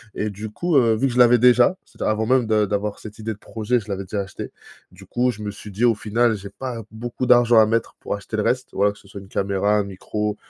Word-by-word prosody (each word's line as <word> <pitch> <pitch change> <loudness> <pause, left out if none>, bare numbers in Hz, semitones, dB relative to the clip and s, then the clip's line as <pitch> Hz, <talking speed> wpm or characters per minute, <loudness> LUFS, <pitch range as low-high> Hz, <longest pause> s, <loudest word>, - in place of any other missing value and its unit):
Et 105 0 -2
du 105 +2 -7
coup, 175 +9 -2
heu, 115 -3 +4
vu 120 +5 0
que 125 - -3
je 125 - 0
l'avais 125 0 +7
déjà. 125 +9 +5
C'est-à-dire - - -4
avant 110 +1 -1
même 125 0 +2
de 110 -1 +3
d'avoir 100 +1 -2
cette 110 -1 -10
idée 110 0 -3
de - - -15
projet, 115 +4 -1
je 105 - -12
l'avais 100 -1 -3
déjà 100 +2 -3
achetée. 95 - -7 0.4
Du - - -15
coup, 125 +1 0
je 105 - -11
me 105 - -3
suis 105 +1 -11
dit: 110 +5 +1
«Au 115 - +5
final, 110 +2 +1
j'ai 100 -1 -8
pas 120 +2 -6
beaucoup 120 +3 -4
d'argent 120 -2 +6
à 110 - +7
mettre 115 +1 -1
pour - - -3
acheter 100 +2 -7
le 105 - 0
reste. 125 +1 0
Voilà, 100 +1 +2
que 105 - -16
ce 100 - -19
soit 100 0 -9
une 95 - -14
caméra, 100 +1 0
un 105 - +1
micro, 105 +2 -4
110 Hz, 275 wpm, -22 LUFS, 105-120 Hz, 0.4 s, l'avais